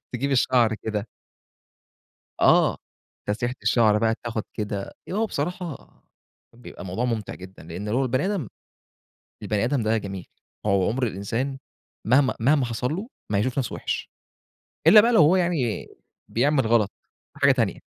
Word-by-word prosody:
تجيب 140 Hz, +4 st, -1 dB
الشَّعر 120 Hz, -3 st, +3 dB
كده 110 Hz, 0 st, -4 dB, 1.3 s
آه، -, -, +5 dB, 0.5 s
تسريحة 120 Hz, +5 st, -2 dB
الشَّعر 110 Hz, -3 st, +4 dB
بقى 115 Hz, +1 st, +1 dB
تاخد 115 Hz, -2 st, -3 dB
كده 105 Hz, -2 st, -4 dB, 0.2 s
هو 215 Hz, +4 st, +1 dB
بصراحة 175 Hz, -3 st, -4 dB, 0.6 s
بيبقى 120 Hz, +1 st, -12 dB
الموضوع 95 Hz, +6 st, -2 dB
ممتِع 115 Hz, -4 st, -3 dB
جدًا، 95 Hz, -2 st, -12 dB
لأن 90 Hz, +6 st, -6 dB
لو 125 Hz, +5 st, +1 dB
البني 130 Hz, +5 st, 0 dB
آدم 195 Hz, -, -2 dB, 1.0 s
البني 105 Hz, 0 st, 0 dB
آدم 125 Hz, +1 st, 0 dB
ده 110 Hz, +1 st, +1 dB
جميل، 100 Hz, -3 st, -6 dB, 0.4 s
هو 100 Hz, -3 st, +2 dB
عُمْر 125 Hz, +3 st, 0 dB
الإنسان 115 Hz, +7 st, -3 dB, 0.5 s
مهما 130 Hz, +2 st, +4 dB
مهما 140 Hz, +4 st, +3 dB
حصَل 120 Hz, +4 st, -2 dB
له 210 Hz, +5 st, -5 dB, 0.2 s
ما 100 Hz, -, +2 dB
هيشوف 130 Hz, +5 st, -1 dB
نفْسه 130 Hz, -, -2 dB
وِحش -, -, -4 dB, 0.8 s
إلا 215 Hz, -, +10 dB
بقى 235 Hz, +3 st, +3 dB
لو 225 Hz, -, +6 dB
هو 155 Hz, +5 st, +6 dB
يعني 170 Hz, -, 0 dB, 0.4 s
بيعمل 135 Hz, +1 st, +2 dB
غلط، 110 Hz, -3 st, +3 dB, 0.5 s
حاجة -, -, +5 dB
تانية. -, -, -1 dB
120 Hz, 145 wpm, -24 LUFS, 105-140 Hz, 1.3 s, إلا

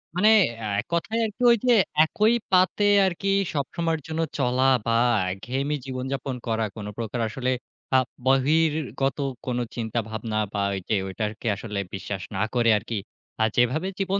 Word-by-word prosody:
মানে 195 Hz, +4 st, +5 dB, 0.3 s
অ্যা 110 Hz, -, -5 dB, 0.3 s
কথায় 210 Hz, +7 st, -1 dB
আরকি 215 Hz, +3 st, -7 dB
ওই 235 Hz, -, +5 dB
যে 245 Hz, -, +6 dB, 0.3 s
একই 215 Hz, +7 st, +2 dB, 0.2 s
পাতে 185 Hz, +2 st, +3 dB, 0.2 s
আরকি 190 Hz, +1 st, -2 dB, 0.3 s
সবসময়ের 160 Hz, +3 st, -1 dB
জন্য 160 Hz, 0 st, -2 dB, 0.2 s
চলা 125 Hz, -1 st, +1 dB, 0.2 s
বা 115 Hz, -, +1 dB, 0.4 s
একঘেয়েমি 135 Hz, +9 st, -2 dB
জীবনযাপন 130 Hz, 0 st, -4 dB
করা। 110 Hz, -1 st, 0 dB
কোন 105 Hz, -, -7 dB
প্রকার 115 Hz, +1 st, -3 dB
আসলে 125 Hz, +3 st, -2 dB, 0.4 s
আ -, -, +8 dB, 0.3 s
বহির্গত 140 Hz, 0 st, +2 dB, 0.3 s
কোন 125 Hz, -1 st, -1 dB, 0.2 s
চিন্তাভাবনা 110 Hz, -1 st, -3 dB, 0.2 s
বা 100 Hz, -, -1 dB
ওই 95 Hz, -, -2 dB
যে 110 Hz, -, +3 dB
ওই 95 Hz, -, -6 dB
আরকি 110 Hz, +2 st, -5 dB
আসলে 105 Hz, -1 st, -5 dB
বিশ্বাস 95 Hz, -1 st, -5 dB
না 95 Hz, -, -1 dB
করে 120 Hz, -2 st, +3 dB
আরকি, 110 Hz, +2 st, -5 dB, 0.5 s
আ -, -, +5 dB
যেভাবে 130 Hz, +9 st, +2 dB
জীবন 195 Hz, +1 st, 0 dB
130 Hz, 150 wpm, -25 LUFS, 115-160 Hz, 0.5 s, আ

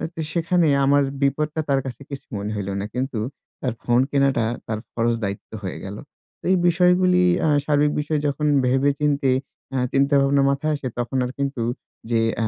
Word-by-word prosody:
তো -, -, -8 dB
সেখানে 170 Hz, 0 st, +2 dB, 0.2 s
আমার 140 Hz, +1 st, +4 dB, 0.2 s
বিপদটা 150 Hz, +3 st, 0 dB
তার 135 Hz, -1 st, +3 dB
কাছে 130 Hz, 0 st, -7 dB
কিছু 140 Hz, 0 st, -7 dB
মনে 100 Hz, +1 st, -4 dB
হইল 100 Hz, -1 st, -3 dB
না। -, -, -3 dB
কিন্তু 130 Hz, -2 st, -2 dB, 0.4 s
তার 125 Hz, -3 st, -1 dB
ফোন 120 Hz, 0 st, +3 dB
কেনাটা, 135 Hz, -4 st, +2 dB, 0.2 s
তার 110 Hz, -1 st, -2 dB
ফরজ 115 Hz, 0 st, +1 dB
দায়িত্ব 100 Hz, 0 st, -4 dB
হয়ে 95 Hz, -, -4 dB
গেল। 100 Hz, +1 st, -6 dB, 0.4 s
তো -, -, -68 dB
এই 190 Hz, -, +4 dB
বিষয়গুলি 180 Hz, +1 st, +4 dB, 0.2 s
আ -, -, +3 dB, 0.2 s
সার্বিক 145 Hz, 0 st, +3 dB
বিষয় 150 Hz, +1 st, -1 dB
যখন 150 Hz, +1 st, -1 dB, 0.2 s
ভেবে 135 Hz, +3 st, +3 dB
চিন্তে, 140 Hz, -2 st, +2 dB, 0.4 s
আ -, -, +1 dB, 0.2 s
চিন্তা 140 Hz, +1 st, +2 dB
ভাবনা 140 Hz, 0 st, +3 dB
মাথায় 150 Hz, +3 st, 0 dB
আসে, 135 Hz, -, -5 dB
তখন 120 Hz, +2 st, -2 dB
আর 125 Hz, -, -4 dB
কিন্তু 140 Hz, -3 st, -2 dB, 0.5 s
যে, 115 Hz, -, +3 dB, 0.2 s
অ্যা 115 Hz, -, +1 dB
140 Hz, 185 wpm, -22 LUFS, 120-150 Hz, 0.5 s, আমার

